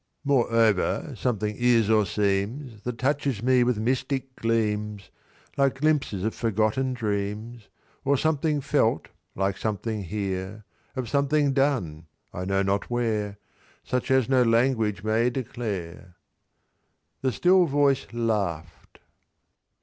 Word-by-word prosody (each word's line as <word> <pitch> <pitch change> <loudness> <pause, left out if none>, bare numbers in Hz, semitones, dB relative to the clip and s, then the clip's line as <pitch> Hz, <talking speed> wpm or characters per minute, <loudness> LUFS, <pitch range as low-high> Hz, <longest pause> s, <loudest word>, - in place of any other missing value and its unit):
"Moreover, 115 -7 +2
something 105 -4 -1
is 120 -3 +4
or 110 -2 +3
seems, 105 +5 -1
That 125 0 -4
touches 135 -4 -1
me 125 0 +4
with 120 -2 +1
mystic 130 +3 -2
gleams, 105 -3 -1 0.5
Like 135 -1 +2
glimpses 145 -10 +1
of 110 - -1
forgotten 115 +4 0
dreams— 105 +1 -4 0.3
"Of 140 -1 +2
something 155 -1 +1
felt, 130 - +1 0.3
like 95 0 -1
something 110 0 -3
here; 95 +2 -4 0.3
Of 130 -2 -3
something 140 +2 +2
done, 120 - 0 0.3
I 90 - -4
know 95 +1 +1
not 100 +1 -1
where; 110 -4 -1 0.5
Such 125 -1 -2
as 130 -2 +3
no 130 -1 +3
language 115 -3 +2
may 110 +3 +2
declare." 100 -8 -5 1.1
The 130 - +1
still 180 - +4
voice 140 -2 +2
laugh'd. 100 -9 -3
115 Hz, 120 wpm, -26 LUFS, 105-130 Hz, 1.1 s, is